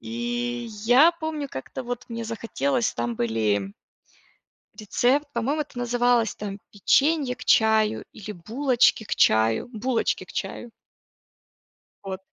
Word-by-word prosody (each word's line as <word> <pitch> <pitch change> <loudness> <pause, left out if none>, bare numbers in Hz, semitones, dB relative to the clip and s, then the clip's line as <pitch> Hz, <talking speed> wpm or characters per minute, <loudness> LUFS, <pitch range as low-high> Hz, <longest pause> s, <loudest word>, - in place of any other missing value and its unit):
И 240 +1 -3 0.2
я 270 +8 +7
помню 315 -4 -4
как-то 130 - -6
вот 245 -1 -5
мне 230 -1 -5
захотелось, 230 +2 -1
там 120 0 -2
были 105 -4 0 1.0
рецепт, 245 +7 +1
по-моему 270 +7 0
это 290 -3 -9
называлось, 245 -1 +1
там, 205 -1 -6
печенье 275 +5 +2
к 250 - -11
чаю 220 -1 +3
или 210 +1 -8
булочки 235 - +1
к - - -2
чаю? 110 - +3
Булочки 235 +1 -1
к - - -13
чаю. 240 - -5 1.3
Вот. 190 -1 -5
235 Hz, 120 wpm, -25 LUFS, 210-255 Hz, 1.3 s, я